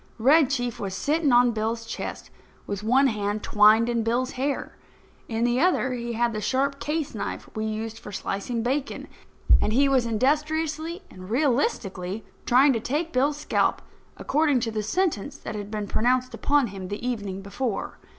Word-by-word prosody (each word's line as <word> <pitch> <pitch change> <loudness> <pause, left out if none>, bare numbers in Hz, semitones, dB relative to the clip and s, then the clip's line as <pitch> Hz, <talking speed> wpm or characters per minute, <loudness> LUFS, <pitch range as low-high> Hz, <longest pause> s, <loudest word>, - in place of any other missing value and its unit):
Red 275 +4 +5
Chief 245 -4 -2
was 195 -2 -4
sitting 300 -1 +1
on 245 0 +5
Bill's 225 +1 -2
chest, - - -6 0.3
with 200 -1 -4
one 255 +6 +3
hand 210 -3 -1
twined 215 +2 +5
in 235 -1 0
Bill's 245 +4 0
hair. 275 +2 -3 0.5
In 225 0 -1
the 240 +1 +2
other 315 -7 +2
he 235 -1 -4
had 235 0 +1
the 215 - -3
sharp 275 +5 0
case 305 -1 -2
knife 210 - -5
we 215 0 -2
used 220 +1 -4
for 210 - -10
slicing 205 +4 -3
bacon; 270 +3 -2 0.5
and 215 - 0
he 275 +4 +4
was 260 -3 +2
industriously 310 - 0
and 185 0 -11
realistically 225 - 0 0.2
trying 265 +3 +5
to 230 - 0
take 300 +8 -2
Bill's 280 +3 +2
scalp, 300 - +1 0.4
according 290 -2 +2
to 230 - -2
the 215 -1 -2
sentence 280 - -1
that - - -7
had 205 -1 -6
been 210 -1 -3
pronounced 250 +4 +1
upon 285 -3 +2
him 190 -2 -6
the 205 +5 -4
evening 200 -5 -3
before. 200 +2 -4
240 Hz, 170 wpm, -25 LUFS, 215-280 Hz, 0.5 s, Red